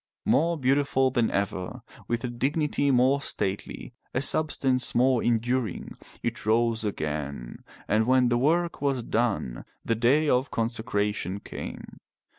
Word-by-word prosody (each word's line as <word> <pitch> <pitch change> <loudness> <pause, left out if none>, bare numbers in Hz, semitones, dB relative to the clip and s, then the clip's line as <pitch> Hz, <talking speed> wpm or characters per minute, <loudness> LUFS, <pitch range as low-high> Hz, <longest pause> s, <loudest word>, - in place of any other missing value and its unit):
More 170 +3 +2
beautiful 135 -1 +2
than 120 -3 +1
ever, 100 -2 -3 0.2
with 120 +1 -2
a - - -1
dignity 140 +4 0
more 130 +2 +3
stately, 100 +1 -3 0.2
a 130 - +1
substance 135 -5 +2
more 125 0 +3
enduring, 120 -2 -1 0.3
it - - -3
rose 115 +1 +1
again, 75 - -4 0.2
and 110 +2 +2
when 130 -1 +4
the 120 - +2
work 170 +5 +1
was 135 -4 0
done, 110 - -1 0.2
the 115 - +1
day 130 +7 +3
of 130 -1 +2
consecra 110 -3 -1
tion 100 -1 -4
came. - - -8
120 Hz, 135 wpm, -26 LUFS, 110-135 Hz, 0.3 s, when